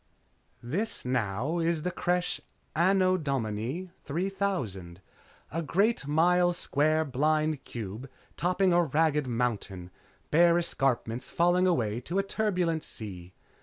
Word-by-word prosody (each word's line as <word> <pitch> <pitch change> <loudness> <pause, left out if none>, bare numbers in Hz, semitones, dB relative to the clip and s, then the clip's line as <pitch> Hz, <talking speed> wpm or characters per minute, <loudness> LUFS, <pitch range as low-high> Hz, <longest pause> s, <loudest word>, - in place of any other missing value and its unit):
_ - - -9
_This, 195 - -2
now, 125 - -1
is 165 -2 0
the 180 - -1
Creche, 180 0 -1 0.3
Anno 185 +2 +3
Domini 135 - -3
3000. 145 - -2 0.5
A 165 - -2
great 195 +2 +1
mile 175 +4 +3
square 155 -1 +1
blind 155 +1 +1
cube 115 +3 -6 0.3
topping 180 +1 +2
a 175 - +5
ragged 150 -1 +1
mountain; 105 -7 -2 0.4
bare 170 +2 +5
escarpments 125 -7 -1
falling 175 +2 +3
away 115 - +1
to 170 +9 -3
a 195 - +3
turbulent 180 -6 0
sea. 95 -8 -8
155 Hz, 120 wpm, -29 LUFS, 125-180 Hz, 0.5 s, a